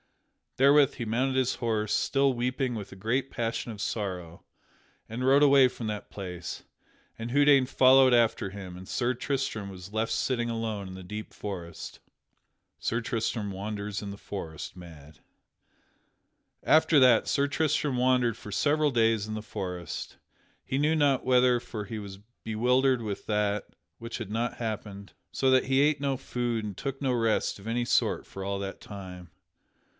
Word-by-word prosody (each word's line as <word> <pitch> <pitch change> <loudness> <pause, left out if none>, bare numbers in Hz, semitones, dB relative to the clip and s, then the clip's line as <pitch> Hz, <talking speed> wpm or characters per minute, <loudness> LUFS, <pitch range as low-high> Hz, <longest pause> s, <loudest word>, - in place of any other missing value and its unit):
Therewith 140 +1 +5
he 120 - -4
mounted 125 +4 0
his 130 -1 +1
horse, 110 -3 -1
still 135 -1 +2
weeping 125 +1 -1
with 105 -3 -6
a - - -9
great 125 +7 -1
passion 115 0 -3
of 105 - -9
sorrow, 90 -6 -4 0.6
and 120 +3 -4
rode 140 +2 +5
away 140 -2 +7
from 120 -2 -6
that 105 -1 -5
place, 90 -3 -6 0.5
and 115 +1 -5
Houdaine 140 -1 +5
followed 130 0 +6
after 115 -4 +3
him 95 -2 -8
and 95 +1 -10
Sir 125 0 0
Tristram 125 -5 -3
was 95 +1 -10
left 110 +1 0
sitting 120 +1 0
alone 110 -4 -3
in 95 - -8
the 95 - -9
deep 105 +4 -7
forest. 85 -5 -6
[Sidenote: - - -22 0.7
Sir 115 +2 -1
Tristram 115 -2 -1
wanders 100 +1 -4
in 100 - -6
the 100 - -7
forest 85 -7 -7
mad] 80 -4 -13 1.4
After 155 -1 +5
that 125 -4 +5
Sir 140 0 +2
Tristram 150 -2 0
wandered 125 -2 +2
for 105 - -10
several 150 +7 +2
days 115 -3 +2
in 110 - -4
the 110 - -5
forest, 90 -7 -6 0.5
he 135 - -1
knew 155 +2 +3
not 145 -4 +2
whither 125 -1 +4
for 105 -4 -6
he 110 +2 -5
was 100 -2 -8 0.3
bewildered 125 +3 +2
with 105 -2 -5
that 105 -1 0 0.3
which 115 0 -6
had 110 -4 -6
happened; 110 -4 -4 0.2
so 135 - +1
that 130 0 +4
he 135 +1 +2
ate 150 0 +3
no 135 -2 0
food 120 -3 -2
and 105 -2 -5
took 135 +5 -5
no 130 -2 +1
rest 115 -2 +1
of 100 - -11
any 120 +1 0
sort - - +1
for 95 - -8
all 100 +1 -2
that 95 0 -6
time. 90 -4 -9
115 Hz, 170 wpm, -28 LUFS, 100-130 Hz, 1.4 s, away